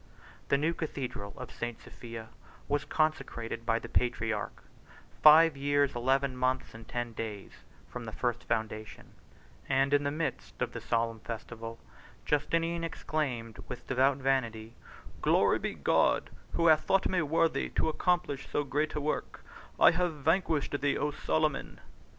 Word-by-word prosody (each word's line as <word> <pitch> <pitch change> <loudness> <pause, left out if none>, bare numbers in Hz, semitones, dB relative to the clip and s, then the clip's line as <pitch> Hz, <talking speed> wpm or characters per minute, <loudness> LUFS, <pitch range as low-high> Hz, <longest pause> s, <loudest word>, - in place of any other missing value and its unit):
The 140 - +4
new 160 +4 +1
Cathedral 130 - -5
of - - -7
St. 120 -1 -5
Sophia 115 -2 -9 0.4
was 145 +1 0
consecrated 115 -7 -1
by 115 -1 +3
the 115 - -6
patriarch, 110 -3 -1 0.6
five 155 0 +8
years, 145 0 +2
eleven 130 +2 +1
months, 130 +1 0
and 110 0 -11
ten 120 -1 -3
days 110 -3 -6 0.4
from 125 -1 -7
the 110 - -5
first 120 +1 -2
foundation; 110 -1 -3 0.6
and 135 +1 +3
in 145 0 +4
the 140 - +1
midst 155 +3 -4
of - - -1
the - - -5
solemn 115 -1 0
festival 115 +1 -7 0.5
Justinian 165 +3 0
exclaimed 130 -8 -3
with - - -7
devout 130 +1 +3
vanity, 120 -5 -1 0.5
"Glory - - +4
be - - -3
to - - -18
God, - - +2 0.2
who 170 - +1
hath 155 -2 +6
thought 195 0 +2
me 185 -2 +1
worthy 160 +2 +1
to - - 0
accomplish 160 -4 0
so 145 - 0
great 150 +3 -1
a - - 0
work; 150 +1 -3 0.3
I - - +8
have 175 -1 0
vanquished 155 -2 +1
thee, 145 0 +2
O 150 - 0
Solomon!" 155 0 -1
135 Hz, 150 wpm, -30 LUFS, 115-155 Hz, 0.6 s, five